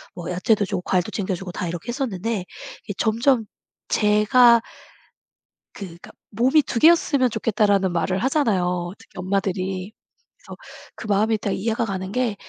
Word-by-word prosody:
뭐 175 0 -6
야채도 205 +3 +1
주고 190 -2 -3
과일도 180 -2 0
챙겨주고 190 -2 -4
다 180 - -4
이렇게 175 +6 -6
했었는데 225 -6 -3 0.4
이 205 - -3
점점 230 +1 +2 0.4
제가 225 +3 +4 1.1
그니까 175 -4 -10 0.2
"몸이 260 +8 +3
2 230 - -3
개였으면 290 -6 +4
좋겠다."라는 205 -4 +1
말을 185 +2 -1
하잖아요. 185 - 0
특히 225 -4 -19
엄마들이. 190 0 -2 0.5
그래서 - - -12 0.4
그 220 - -8
마음이 215 +2 +2
다 205 -2 -3
이해가 225 +4 -1
가는 190 -2 -4
게, 235 -2 -1
205 Hz, 315 characters per minute, -22 LUFS, 185-230 Hz, 1.1 s, 제가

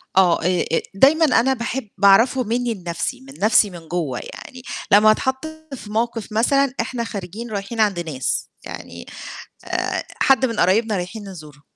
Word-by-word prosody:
آه، 185 -3 +4
آآ 180 0 +1
أ 165 - +2
دايمًا 295 +10 +5
أنا 265 -2 +3
باحب 235 -1 -4
باعرفه 225 +6 +5
مني 235 +1 -1
لنَفْسي 180 +8 -4
من 270 +1 -13
نَفْسي 215 0 +4
من 170 -3 -11
جوّه، 155 -8 -2
يعني 255 - -11 0.3
لمّا 210 +2 +7
اتحط 265 +6 -1 0.3
في 210 -5 -10
موقف 225 0 -2
مثلًا 260 +5 +2
إحنا 240 -2 -3
خارجين 215 +2 -7
رايحين 205 +3 -5
عند 205 -5 +2
ناس، 155 -6 -2 0.2
يعني - - -9 0.6
آآ، - - -2 0.2
حد 265 -1 +4
من 230 -3 -2
قرايبنا 210 +4 +2
رايحين 195 +3 -6
نزوره 150 -5 -12
215 Hz, 160 wpm, -21 LUFS, 185-245 Hz, 0.6 s, لمّا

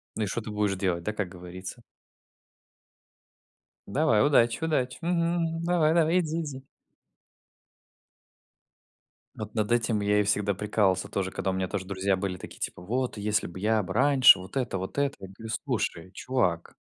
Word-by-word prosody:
Ну 110 - -1
и - - +1
что 120 - -3
ты 110 - -8
будешь 105 -2 0
делать, 90 -3 -1
да, 105 - -2
как 105 -4 -3
говорится? 90 +5 -9 2.1
Давай, 120 -1 +3
удачи, 120 -2 +3
удачи, 130 -6 0
мгм, 170 0 +1
мгм, 165 0 -3
давай, 170 -2 +3
давай, 170 +1 +3
иди, 165 -1 -2
иди. 135 -4 -7 2.7
Вот 110 -1 -7
над 110 +1 0
этим 115 -3 +1
я 105 0 +2
и - - +3
всегда 100 0 +1
прикалывался 100 -2 +1
тоже, 95 -1 -2
когда 95 - -2
у - - -3
меня 95 0 -1
тоже 95 0 -4
друзья 95 +1 0
были 95 -1 -3
такие, - - -11
типа: - - -5
"Вот, 125 +5 -2
если 105 0 0
б 85 +2 -9
я 110 +2 +2
б 95 +1 -5
раньше, 130 -4 +7
вот 95 +8 -7
это, 125 -7 -1
вот 95 +6 -6
это!" 140 -1 +1
Я 95 - -8
говорю: 110 +4 -10
"Слушай, 85 +2 -2
чувак!" 95 -9 -1
105 Hz, 170 wpm, -27 LUFS, 95-135 Hz, 2.7 s, раньше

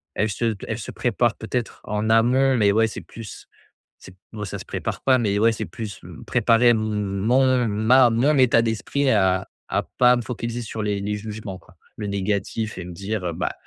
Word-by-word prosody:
elles 110 0 0
se 115 - -2
t 100 - -10
elles 110 0 -3
se - - -7
préparent 120 -1 0
peut-être 115 +1 -4
en 105 +1 -2
amont, 125 +4 +4
mais 100 -2 +4
ouais, 110 +2 +3
c'est - - -7
plus 115 -3 -10 0.5
c'est 95 - -14 0.2
bon, 105 -1 -5
ça 95 - -5
se - - -10
prépare - - -4
pas, 130 -1 +4
mais, 105 -5 0
ouais, 115 +2 +4
c'est 110 - -4
plus, 105 -5 -8
mmh, - - -11
préparer 120 0 +3
m 120 - +5
m 105 -2 -2
mon 125 +2 +3
ma 115 +4 +4
mon 135 +6 +2
état 125 -3 +5
d'esprit 115 +5 -1
à 95 -3 +2 0.2
à - - -1
pas 125 0 +5
me 120 - -2
focaliser 120 0 -4
sur 110 -1 -5
les 105 -1 -1
les 105 +1 -2
jugements, 105 -2 -7
quoi. - - -19 0.2
Le 105 - -5
négatif 100 +2 -2
et 90 - -5
me 90 - -8
dire, 100 +2 -4
heu, 85 - -1
bah: 90 +2 -2
110 Hz, 215 wpm, -23 LUFS, 105-120 Hz, 0.5 s, m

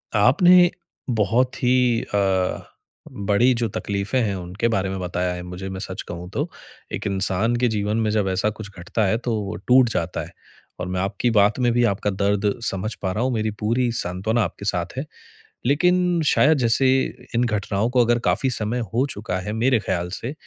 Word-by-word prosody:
आपने 175 - +6 0.5
बहुत 125 +4 +1
ही 125 -1 +3
अ, 95 -2 0 0.5
बड़ी 105 +5 +2
जो 115 -1 0
तकलीफ़ें 100 +5 -2
हैं, 100 -4 -1
उनके 90 +5 -2
बारे 100 -4 0
में 95 0 -4
बताया 90 0 -2
है 90 0 -6
मुझे, 90 +2 -7
मैं 95 0 -6
सच 95 -2 -5
कहूँ 90 +1 -7
तो। - - -2 0.4
एक - - -3
इंसान 100 +4 +1
के 125 0 +2
जीवन 105 -1 -1
में 110 -1 +1
जब 105 -3 +1
ऐसा 95 +3 +1
कुछ 105 -1 -8
घटता 105 +4 -1
है, 110 +4 +2
तो 120 -2 -2
वो 100 -2 -5
टूट 125 -1 +6
जाता - - -2
है। - - -14 0.5
और 90 - -3
मैं 90 0 -2
आपकी 100 +5 -1
बात 105 +3 +4
में 120 -1 +2
भी 120 0 +2
आपका 105 -1 0
दर्द 100 +1 +1
समझ 100 +3 -2
पा 95 -1 -1
रहा 115 - -1
हूँ, 130 - +1
मेरी 110 -1 -1
पूरी 120 +3 +1
सांत्वना 105 +5 -1
आपके 100 - -6
साथ 90 +2 -2
है। 135 - -2 0.6
लेकिन 180 +3 +2
शायद, 150 +2 +4
जैसे 125 +2 +3 0.5
इन 120 - +3
घटनाओं 105 0 -1
को 125 -1 +4
अगर 120 0 +2
काफ़ी 105 +9 +2
समय 115 +2 -1
हो 130 +4 +2
चुका 95 -3 -4
है, 105 +3 -5
मेरे 120 +1 +2
ख़्याल 90 -3 -2
से, 125 +5 -5
105 Hz, 195 wpm, -22 LUFS, 95-120 Hz, 0.6 s, आपने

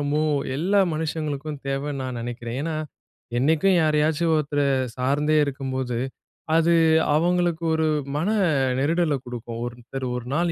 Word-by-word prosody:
ரொம்பவும் 145 0 +1 0.2
எல்லா 195 +6 +2
மனுஷங்களுக்கும் 155 -2 -3
தேவன்னு 135 0 -2
நான் 130 -2 -4
நெனைக்கிறேன். 120 0 -5
ஏன்னா, 160 +1 -2 0.6
என்னைக்கும் 160 +7 +3
யாரையாச்சும் 155 +2 +2
ஒருத்தர 145 -1 -1 0.4
சார்ந்தே 145 +4 +1
இருக்கும்போது, 130 -3 -3 0.6
அது 165 +1 +4 0.4
அவங்களுக்கு 175 0 +1
ஒரு 160 0 +1 0.3
மன 165 - 0 0.5
நெருடல 160 +1 +2
குடுக்கும். 120 -1 -6
ஒருத்தர் 120 +2 -6
ஒரு 125 -1 -5
நாள் 170 +2 +1
150 Hz, 120 wpm, -24 LUFS, 130-160 Hz, 0.6 s, அது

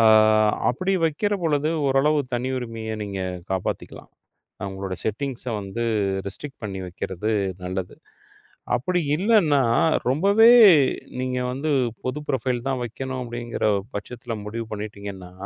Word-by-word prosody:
ஆ - - +6 0.6
அப்படி 185 +10 0
வைக்கிறபொழுது, 160 -3 0 0.2
ஓரளவு 140 +3 +3 0.2
தனியுரிமைய 120 -3 -3
நீங்க 100 -2 -5 0.3
காப்பாத்திக்கலாம். 95 -1 -4 0.6
உங்களோட 95 -1 -5
செட்டிங்ஸ் 125 +3 -3
வந்து 100 +4 -4 0.4
ரெஸ்ட்ரிக் 135 +8 -7
பண்ணி 95 -2 -4
வைக்கிறது 95 +3 -4 0.3
நல்லது. 90 0 -4 0.8
அப்படி 180 +9 0 0.2
இல்லன்னா, 175 -8 +4 0.5
ரொம்பவே 200 - +5 0.7
நீங்க 130 0 -1
வந்து 140 +4 -2 0.3
பொது 130 +4 -2
ப்ரொபைல் 130 -2 0
தான் 135 -2 -1
வைக்கணும் 130 +2 -5
அப்படிங்குற 120 0 -4 0.3
பட்சத்துல 120 +3 -5
முடிவு 115 +2 -4
பண்ணிட்டீங்கன்னா, 100 -3 -7
125 Hz, 105 wpm, -24 LUFS, 105-145 Hz, 0.8 s, ஆ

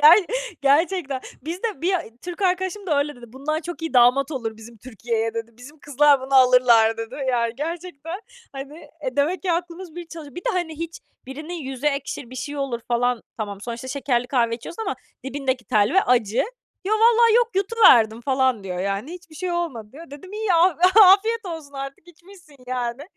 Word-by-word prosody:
Ger 315 +6 +9 0.4
gerçekten. 285 -1 +2 0.2
Bizde 355 - -4
bir 375 +2 +2 0.3
Türk 355 +2 -6
arkadaşım 375 +2 -1
da 300 -4 +2
öyle 295 0 -1
dedi: 240 -1 -12
"Bundan 310 +4 -2
çok 345 0 -8
iyi 325 -4 -4
damat 255 +4 +5
olur 230 -6 -4
bizim 225 +1 -13
Türkiye'ye." 225 -1 -3
dedi. 230 0 -5
"Bizim 285 +6 -14
kızlar 290 -1 +3
bunu 265 +1 -3
alırlar." 250 -3 +5
dedi. 225 0 -6
Ya 235 -2 +1
gerçekten, 330 - -6 0.3
hani, 275 +2 -8
eee, - - -8
demek 320 +8 +1
ki 365 - +1
aklımız 345 0 -4
bir 350 -1 -7
çalışıyor. 310 -4 -10
Bir 355 - -6
de, - - 0
hani, 340 -4 -2
hiç 335 0 -6 0.3
birinin 305 +6 -7
yüzü 270 -4 -5
ekşir, 280 -3 -2
bir - - -10
şey 290 +2 -5
olur 270 -4 -3
falan. 245 -1 +1
Tamam, 205 -3 -5
sonuçta 235 +3 -6
şekerli 250 -3 -1
kahve 235 -4 +1
içiyorsun 335 - -8
ama - - -2 0.3
dibindeki 270 -2 -2
telve 220 - +3
acı. 235 -2 +2 0.4
"Yo, 400 - -1
valla 460 +1 +5
yok, 480 -1 +3
yutuverdim 365 - +5
falan." 260 -4 +1
diyor, 180 -2 -4
yani. 200 - -3
"Hiçbir 345 -3 -12
şey 360 +2 -3
olmadı." 305 -11 -3
diyor. 320 +3 -12
Dedim, 295 +7 -11
"İyi, 425 -2 -1
af 335 0 +4 0.3
afiyet 425 +4 +5
olsun 320 -5 -7
artık, 275 +4 -8
içmişsin, 350 -3 -17
yani. 250 +1 -3
285 Hz, 180 wpm, -23 LUFS, 245-350 Hz, 0.4 s, Ger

